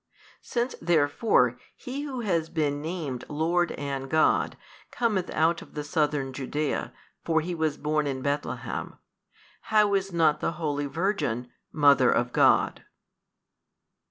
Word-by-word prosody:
Since 240 Hz, +1 st, -2 dB
therefore 145 Hz, -, +2 dB, 0.2 s
He 265 Hz, +3 st, -6 dB
Who 270 Hz, -4 st, -4 dB
has 170 Hz, -7 st, 0 dB
been 145 Hz, -3 st, -1 dB
named 155 Hz, -6 st, -4 dB
Lord 170 Hz, +3 st, +1 dB
and 135 Hz, -1 st, -4 dB
God, 155 Hz, +1 st, +2 dB, 0.3 s
cometh 210 Hz, -7 st, 0 dB
out 165 Hz, +2 st, +1 dB
of -, -, -14 dB
the 150 Hz, -, -3 dB
southern 145 Hz, -3 st, 0 dB
Judea, 140 Hz, +3 st, -2 dB, 0.3 s
for 160 Hz, -1 st, +2 dB
He 175 Hz, +3 st, -4 dB
was 160 Hz, -3 st, -1 dB
born 150 Hz, 0 st, 0 dB
in 130 Hz, -2 st, -3 dB
Bethlehem, 145 Hz, +1 st, -3 dB, 0.7 s
how 210 Hz, -2 st, +4 dB
is 195 Hz, 0 st, 0 dB
not 160 Hz, -3 st, +3 dB
the -, -, -1 dB
holy 145 Hz, -3 st, -2 dB
Virgin 140 Hz, -, -1 dB, 0.2 s
Mother 145 Hz, -2 st, +5 dB
of -, -, 0 dB
God? -, -, +3 dB
155 Hz, 130 wpm, -27 LUFS, 145-175 Hz, 0.7 s, Mother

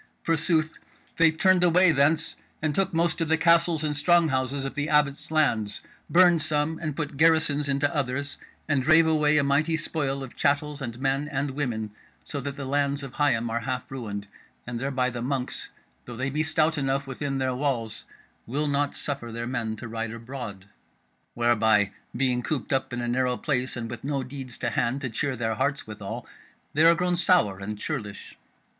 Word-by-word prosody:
Forsooth, 160 Hz, -1 st, +1 dB, 0.4 s
they 165 Hz, 0 st, +6 dB
turned 180 Hz, +3 st, +3 dB
away 180 Hz, 0 st, +5 dB
thence 155 Hz, +2 st, +2 dB, 0.2 s
and 155 Hz, -1 st, -1 dB
took 195 Hz, +3 st, +1 dB
most 170 Hz, 0 st, +1 dB
of 165 Hz, -, +1 dB
the 160 Hz, +1 st, +3 dB
castles 165 Hz, -1 st, +3 dB
and 150 Hz, -1 st, -1 dB
strong 170 Hz, +2 st, +4 dB
houses 135 Hz, +1 st, -1 dB
of 135 Hz, -, -4 dB
the 145 Hz, 0 st, -2 dB
Abbot's 150 Hz, -2 st, +1 dB
lands; 120 Hz, -10 st, +1 dB, 0.3 s
burned 175 Hz, -2 st, +5 dB
some 155 Hz, +1 st, 0 dB
and 155 Hz, -3 st, -3 dB
put 150 Hz, -3 st, -4 dB
garrisons 155 Hz, -2 st, +3 dB
into 140 Hz, +3 st, 0 dB
others, 140 Hz, 0 st, -2 dB, 0.3 s
and 145 Hz, -4 st, +2 dB
drave 155 Hz, +4 st, +5 dB
away 150 Hz, -1 st, +3 dB
a 145 Hz, -, +4 dB
mighty 150 Hz, +4 st, +2 dB
spoil 140 Hz, -4 st, -2 dB
of 130 Hz, -, -10 dB
chattels 145 Hz, 0 st, 0 dB
and 120 Hz, -2 st, -5 dB
men 135 Hz, +2 st, 0 dB
and 140 Hz, -1 st, -2 dB
women, 120 Hz, -6 st, -3 dB, 0.3 s
so 145 Hz, -, -5 dB
that 140 Hz, +1 st, -5 dB
the 140 Hz, -2 st, -6 dB
lands 140 Hz, +1 st, 0 dB
of 135 Hz, -2 st, -8 dB
Higham 130 Hz, -6 st, +1 dB
are 115 Hz, -, 0 dB
half 125 Hz, +3 st, -4 dB
ruined; 105 Hz, -6 st, -5 dB, 0.4 s
and 120 Hz, -1 st, -4 dB
thereby 130 Hz, -1 st, 0 dB
the 120 Hz, -1 st, -5 dB
monks, 130 Hz, 0 st, -3 dB, 0.4 s
though 120 Hz, -, -8 dB
they 130 Hz, +3 st, -2 dB
be 150 Hz, +3 st, 0 dB
stout 155 Hz, 0 st, +1 dB
enough 135 Hz, 0 st, 0 dB
within 135 Hz, +1 st, -3 dB
their 130 Hz, -1 st, 0 dB
walls, 125 Hz, -5 st, -2 dB, 0.4 s
will 145 Hz, +6 st, -1 dB
not 145 Hz, 0 st, 0 dB
suffer 140 Hz, -5 st, -3 dB
their 115 Hz, +1 st, -4 dB
men 120 Hz, -3 st, -2 dB
to 115 Hz, -, -8 dB
ride 115 Hz, 0 st, -3 dB
abroad. 115 Hz, -4 st, -7 dB, 0.7 s
Whereby, 110 Hz, -4 st, +3 dB, 0.3 s
being 125 Hz, -1 st, +1 dB
cooped 135 Hz, -3 st, -2 dB
up 135 Hz, -, 0 dB
in 125 Hz, 0 st, -3 dB
a 120 Hz, -, -2 dB
narrow 125 Hz, +1 st, +1 dB
place, 130 Hz, -4 st, -1 dB
and 115 Hz, -1 st, -4 dB
with 120 Hz, +1 st, -7 dB
no 140 Hz, -1 st, -1 dB
deeds 130 Hz, -2 st, -7 dB
to 120 Hz, -, -2 dB
hand 125 Hz, +5 st, 0 dB
to 130 Hz, -4 st, -3 dB
cheer 135 Hz, +3 st, -1 dB
their 110 Hz, -2 st, -1 dB
hearts 140 Hz, +5 st, -1 dB
withal, 105 Hz, -2 st, -7 dB, 0.5 s
they 155 Hz, +2 st, +4 dB
are 170 Hz, 0 st, +7 dB
grown 180 Hz, 0 st, 0 dB
sour 170 Hz, -, +3 dB
and 105 Hz, +2 st, -5 dB
churlish." 100 Hz, -1 st, -5 dB
140 Hz, 190 wpm, -26 LUFS, 125-155 Hz, 0.7 s, are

